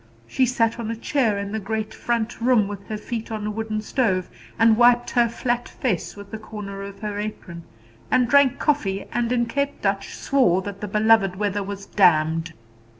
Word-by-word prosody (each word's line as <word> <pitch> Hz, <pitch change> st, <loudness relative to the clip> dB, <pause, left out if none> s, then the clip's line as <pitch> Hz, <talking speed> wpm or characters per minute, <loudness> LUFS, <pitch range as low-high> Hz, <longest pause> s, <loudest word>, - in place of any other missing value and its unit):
She 260 Hz, -1 st, +1 dB
sat 230 Hz, -1 st, +1 dB
on 225 Hz, -2 st, -4 dB
a 230 Hz, -, -2 dB
chair 230 Hz, -2 st, 0 dB
in 200 Hz, 0 st, -4 dB
the 220 Hz, -, -2 dB
great 220 Hz, +1 st, -3 dB
front 235 Hz, -1 st, -2 dB
room, 235 Hz, -4 st, +3 dB
with 200 Hz, -1 st, -8 dB
her 215 Hz, -, -4 dB
feet 225 Hz, +1 st, -5 dB
on 215 Hz, -1 st, -4 dB
a 210 Hz, -, -1 dB
wooden 215 Hz, 0 st, -3 dB
stove, 195 Hz, -7 st, 0 dB, 0.3 s
and 225 Hz, 0 st, +5 dB
wiped 240 Hz, +1 st, +4 dB
her 240 Hz, -2 st, +3 dB
flat 240 Hz, +1 st, -2 dB
face 210 Hz, -, -2 dB
with 200 Hz, -1 st, -11 dB
the 220 Hz, -, -5 dB
corner 205 Hz, -2 st, -7 dB
of 200 Hz, 0 st, -9 dB
her 210 Hz, -1 st, -3 dB
apron, 180 Hz, -5 st, -6 dB, 0.4 s
and 250 Hz, -, +3 dB
drank 280 Hz, 0 st, +4 dB
coffee, 200 Hz, -11 st, 0 dB
and 240 Hz, 0 st, 0 dB
in 240 Hz, -1 st, +2 dB
Cape 280 Hz, +4 st, -2 dB
Dutch 195 Hz, 0 st, -2 dB
swore 190 Hz, -10 st, +2 dB
that 200 Hz, 0 st, -7 dB
the 210 Hz, -, -3 dB
beloved 210 Hz, -2 st, +3 dB
weather 205 Hz, 0 st, -1 dB
was 200 Hz, 0 st, -6 dB
damned. 165 Hz, -4 st, +2 dB
215 Hz, 195 wpm, -23 LUFS, 200-235 Hz, 0.4 s, and